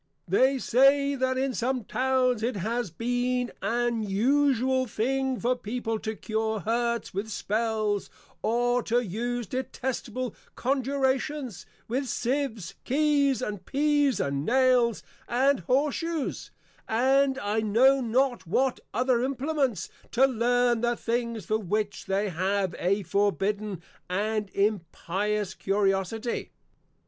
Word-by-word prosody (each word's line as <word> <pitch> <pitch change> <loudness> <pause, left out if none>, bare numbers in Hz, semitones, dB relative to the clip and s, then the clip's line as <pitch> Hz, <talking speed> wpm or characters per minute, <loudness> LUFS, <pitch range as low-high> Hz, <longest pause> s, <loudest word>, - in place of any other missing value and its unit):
They 265 +1 +3
say, 275 +3 +4
that 260 -1 0
in 265 0 0
some 250 0 -1
Towns 255 0 +1
it 235 +1 -1
has 225 +3 -2
been 245 +6 -1
an 240 -1 0
usual 260 +4 +2
thing 265 +4 -1
for 250 +2 +1
People 225 -1 -3
to 220 +1 -4
cure 220 0 -2
Hurts 235 +3 -1
with 200 +3 -3
Spells, 215 -1 -1 0.3
or 245 +2 +1
to 235 +1 +1
use 240 +5 -3
detestable 255 0 -4 0.2
Conjurations, 265 - -1 0.2
with 260 +4 -1
Sieves, 240 -8 -2
Keys, 280 -2 +2
and 205 -5 -4
Pease, 290 -3 +2
and 140 0 -1
Nails, 250 - +3 0.2
and 265 +3 +2
Horse 270 - +1
shoes, 330 -3 -3 0.4
and 265 +4 +3
I 205 0 -1
know 245 +6 +4
not 245 -4 0
what 260 +9 +1 0.2
other 250 0 +2
Implements, 270 - -1 0.3
to 260 +3 +5
learn 245 -1 +2
the 240 0 +1
things 235 -2 -2
for 215 0 0
which 205 0 -2
they 200 +2 0
have 190 +2 0
a 195 +3 +1
forbidden, 200 -1 0 0.3
and 210 +2 -1
an - - -27
impious 200 +1 -1
Curiosity. 195 +4 -1
240 Hz, 120 wpm, -27 LUFS, 210-260 Hz, 0.4 s, to